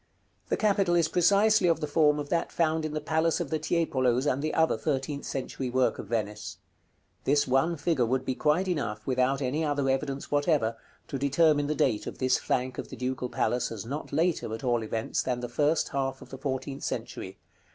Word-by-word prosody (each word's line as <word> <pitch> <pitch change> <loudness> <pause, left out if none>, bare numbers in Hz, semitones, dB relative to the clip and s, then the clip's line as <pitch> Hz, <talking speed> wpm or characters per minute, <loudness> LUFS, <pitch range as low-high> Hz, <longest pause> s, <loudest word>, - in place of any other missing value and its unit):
The - - +1
capital 195 -4 +2
is 170 -2 +3
precisely 200 +4 +4
of 165 -2 +3
the 155 - -1
form 150 0 +3
of 145 -1 -4
that 170 - 0
found 160 -1 +1
in 155 0 -4
the - - 0
palace 160 +2 +1
of 170 -6 -4
the 155 - 0
Tiepolos 140 -6 +1
and 140 -1 +1
the 155 +1 -1
other 160 0 +3
thirteenth 140 -1 -2
century 130 -1 -4
work 130 +1 +1
of - - -6
Venice. 105 -2 -3 0.7
This 145 +1 +2
one 135 +6 +2
figure 140 -6 +1
would 130 +2 0
be 130 - 0
quite 155 +8 +1
enough, 110 - -2
without 130 +2 +1
any 140 +5 0
other 145 -2 0
evidence 135 0 -3
whatever, 145 -6 +2 0.3
to 135 - -4
determine 145 +1 +3
the 150 - -1
date 115 -7 +1
of - - -6
this 130 -1 +2
flank 130 -1 -1
of - - -5
the - - -8
Ducal 125 0 -2
Palace 125 -1 0
as 115 -1 -6
not 140 +6 -5
later, 160 -4 0
at 115 - -10
all 120 -2 +1
events, 110 0 -2
than 125 -1 -2
the 120 - -4
first 150 +6 +1
half 135 -1 -2
of - - -13
the 135 - -8
fourteenth 135 0 -3
century. - - -5
140 Hz, 205 wpm, -28 LUFS, 130-160 Hz, 0.7 s, precisely